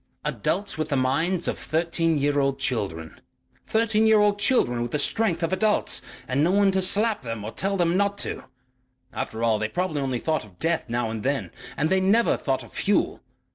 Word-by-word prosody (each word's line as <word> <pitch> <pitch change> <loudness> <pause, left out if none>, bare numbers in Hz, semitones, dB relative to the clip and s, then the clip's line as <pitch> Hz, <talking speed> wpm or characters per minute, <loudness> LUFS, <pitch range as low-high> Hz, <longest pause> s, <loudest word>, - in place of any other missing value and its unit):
"Adults 200 -5 -2
with 155 - -2
the 140 - 0
minds 165 +8 +1
of - - -2
thirteen 165 0 0
year 145 0 +1
old 135 -1 +1
children. 100 - -3 0.5
Thirteen 220 -1 +2
year 220 0 +6
old 205 0 +3
children 205 - +2
with 120 - -2
the 150 - -1
strength 175 +2 0
of 165 +2 0
adults 210 +2 0 0.3
and 135 +3 +1
no 165 - +3
one 200 +1 +4
to 190 0 +1
slap 210 +4 +2
them 115 -4 -5
or 110 - -5
tell 195 +7 -2
them 175 -1 +2
not 200 +1 +1
to.... - - -5 0.7
After 110 +1 -4
all, 110 -2 +2
they 110 0 -1
probably 160 +1 -2
only 130 -2 -1
thought 155 +3 -1
of 100 -4 -17
death 165 - 0
now 120 -1 -1
and 110 -1 -4
then. 140 +3 -1 0.3
And 155 +4 0
they 190 - +4
never 205 +5 +3
thought - - -2
of - - -15
fuel. - - 0
160 Hz, 205 wpm, -25 LUFS, 130-195 Hz, 0.7 s, year